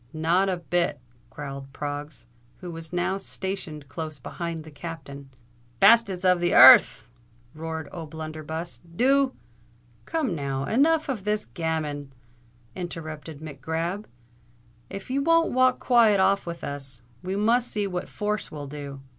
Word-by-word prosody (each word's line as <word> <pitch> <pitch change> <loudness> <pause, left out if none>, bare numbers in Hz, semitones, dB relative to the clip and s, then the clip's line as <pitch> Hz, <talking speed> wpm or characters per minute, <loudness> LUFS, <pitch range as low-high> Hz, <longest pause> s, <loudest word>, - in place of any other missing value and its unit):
"Not 170 +5 +2
a 185 - 0
bit," 170 -3 0 0.3
growled 135 +2 -7
Proggs, 145 -2 -6 0.3
who 180 -2 -8
was 165 -1 -9
now 180 +2 0
stationed 190 -8 -5
close 155 0 -6
behind 165 +4 -5
the 155 - -12
Captain. 140 -2 -8 0.5
"Bastes 200 -6 +5
of 180 -1 +5
the 175 0 +1
ear 130 +1 +12
rth!" - - -12 0.5
roared 160 0 -5
O'Blunderbuss: 160 0 -6
"do——" 260 +11 +2 0.7
"Come 310 - -1
now—enough 215 - +1
of 245 -9 -3
this 210 +1 -1
gammon," 155 -4 -3 0.6
interrupted 155 -4 -7
Mac 145 -4 -9
Grab. 165 +7 -3 0.8
"If 195 +5 -7
you 275 +2 +1
won't 330 +2 +3
walk 255 0 +4
quiet 230 -5 +4
off 195 0 +2
with 170 0 -6
us, 135 -4 -5 0.2
we 185 +1 -3
must 230 +4 +2
see 205 -1 -1
what 180 -2 -4
force 210 0 -2
will 145 -2 -6
do." 140 -1 -7
170 Hz, 140 wpm, -26 LUFS, 150-200 Hz, 0.8 s, ear